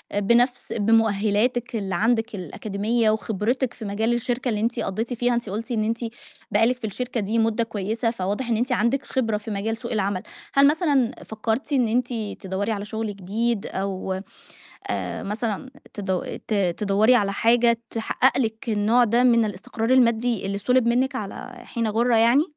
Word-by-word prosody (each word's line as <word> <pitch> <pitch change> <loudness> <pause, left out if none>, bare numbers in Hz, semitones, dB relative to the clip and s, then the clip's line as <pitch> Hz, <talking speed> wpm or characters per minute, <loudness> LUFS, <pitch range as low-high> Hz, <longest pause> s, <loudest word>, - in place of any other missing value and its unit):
بنفْس 235 +5 +2
بمؤهلاتِك 225 +2 +2
اللي 195 -4 -2
عندِك 225 +2 +1
الأكاديمية 215 +5 -1
وخبرتِك 220 +4 -1
في 220 - -8
مجال 220 +4 0
الشركة 245 +1 -1
اللي 210 -2 -1
أنتِ 235 +1 0
قضيتِ 220 +6 -2
فيها 245 +1 +1
أنتِ 235 -4 -3
قُلتِ 230 +5 -4
إن 215 -2 +1
أنتِ 225 +1 -1 0.5
بقى 220 +2 +4
لِك 250 +1 +1
في 225 -3 -4
الشركة 250 +4 -3
دي 215 +2 0
مُدة 225 +1 +2
كويسة، 220 +1 -2
فواضح 205 +4 -3
إن 225 - +2
أنتِ 250 +3 -1
عندِك 245 +4 +1
خبرة 225 -5 0
في 215 +1 -7
مجال 220 +3 -2
سوق 235 0 -7
العمل، 200 -4 0 0.3
هل 275 0 +6
مثلًا 285 -6 +2
فكَّرتِ 225 +6 -2
إن 250 -4 +3
أنتِ 245 +2 0 0.3
تدوّري 195 +3 -2
على 205 -1 -3
شغل 220 -1 -4
جديد 210 +3 -1
أو 190 -1 -3 0.7
آآ - - -3
مثلًا 215 +4 -3 0.2
تد 190 -3 -3
ت 215 - 0 0.2
تدوّري 210 +4 +4
على 200 -4 +2
حاجة 235 +2 +3
تحقق 235 +4 +1
لِك 225 -2 -2
النوع 220 +3 +3
ده 235 +2 +2
من 235 -2 +5
الاستقرار 220 +3 -3
المادي 235 -4 +3
اللي 200 0 -2
سُلِب 250 +2 +2
منِك 255 +3 +1
على 205 -4 -6
حين 230 -1 -2
غَُرة 230 +2 +2
يعني؟ 235 +6 +5
225 Hz, 170 wpm, -24 LUFS, 205-240 Hz, 0.7 s, هل